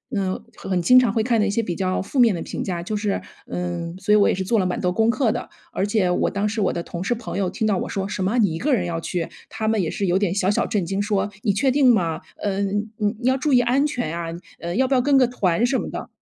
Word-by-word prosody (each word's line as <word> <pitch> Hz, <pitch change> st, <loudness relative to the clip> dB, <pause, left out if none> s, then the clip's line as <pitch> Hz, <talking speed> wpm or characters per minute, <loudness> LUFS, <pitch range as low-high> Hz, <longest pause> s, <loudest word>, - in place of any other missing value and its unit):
嗯， 190 Hz, -2 st, -1 dB
很 185 Hz, -2 st, -2 dB
经 250 Hz, +9 st, +6 dB
常 250 Hz, -4 st, +5 dB
会 220 Hz, +1 st, 0 dB
看 230 Hz, -2 st, +2 dB
的 -, -, +2 dB
一 210 Hz, -, 0 dB
些 215 Hz, +3 st, +1 dB
比 180 Hz, -6 st, -3 dB
较 185 Hz, 0 st, -1 dB
负 255 Hz, +8 st, -3 dB
面 235 Hz, -4 st, +6 dB
的 170 Hz, -, -4 dB
评 -, -, -4 dB
价， 175 Hz, -2 st, -3 dB
就 210 Hz, +5 st, -4 dB
是 205 Hz, -1 st, -1 dB, 0.3 s
嗯， 175 Hz, -1 st, -4 dB
所 200 Hz, +2 st, +2 dB
以 -, -, +7 dB
我 205 Hz, -, +5 dB
也 -, -, +1 dB
是 190 Hz, 0 st, -3 dB
做 225 Hz, +3 st, +2 dB
了 190 Hz, -, +1 dB
蛮 180 Hz, -, -1 dB
多 180 Hz, 0 st, 0 dB
功 220 Hz, +3 st, +2 dB
课 235 Hz, 0 st, +2 dB
的。 240 Hz, -, -5 dB, 0.2 s
而 195 Hz, -, 0 dB
且 205 Hz, -3 st, +1 dB
我 180 Hz, -, +1 dB
当 200 Hz, +1 st, -1 dB
时 215 Hz, 0 st, -2 dB
我 190 Hz, -, +2 dB
的 170 Hz, -, -3 dB
同 170 Hz, +1 st, -6 dB
事 200 Hz, -, +1 dB
朋 235 Hz, -, -6 dB
友 190 Hz, -2 st, 0 dB
听 220 Hz, -, -1 dB
到 200 Hz, -3 st, +2 dB
我 -, -, -3 dB
说 195 Hz, -1 st, -2 dB
“什 190 Hz, -, -3 dB
么， 205 Hz, +6 st, 0 dB
你 205 Hz, -8 st, +3 dB
一 -, -, -3 dB
个 290 Hz, +1 st, +1 dB
人 195 Hz, -8 st, +1 dB
要 170 Hz, -1 st, -2 dB
去？” 170 Hz, 0 st, -2 dB, 0.2 s
他 220 Hz, -, -3 dB
们 220 Hz, -2 st, +2 dB
也 165 Hz, -, -1 dB
是 200 Hz, -, -2 dB
有 180 Hz, 0 st, +2 dB
点 195 Hz, -3 st, 0 dB
小 195 Hz, -1 st, +1 dB
小 -, -, +1 dB
震 200 Hz, -5 st, -1 dB
惊， 195 Hz, +3 st, -1 dB
说： 205 Hz, -1 st, 0 dB
“你 210 Hz, -, +3 dB
确 265 Hz, +7 st, +2 dB
定 255 Hz, -2 st, +5 dB
吗？ 170 Hz, -6 st, 0 dB, 0.2 s
嗯， 200 Hz, +1 st, -1 dB
你 205 Hz, 0 st, 0 dB
你 250 Hz, -, -1 dB
要 260 Hz, -, +3 dB
注 285 Hz, +3 st, -1 dB
意 250 Hz, -, +7 dB
安 255 Hz, +4 st, +2 dB
全 240 Hz, -, -3 dB
啊， 170 Hz, -1 st, -4 dB, 0.3 s
呃， 170 Hz, +1 st, -4 dB
要 265 Hz, -, +3 dB
不 275 Hz, -, 0 dB
要 255 Hz, -, +4 dB
跟 280 Hz, +2 st, +3 dB
个 255 Hz, -2 st, +5 dB
团 205 Hz, -3 st, +1 dB
什 260 Hz, +1 st, +1 dB
么 -, -, -4 dB
的。” -, -, -6 dB
205 Hz, 325 characters per minute, -22 LUFS, 185-235 Hz, 0.3 s, 以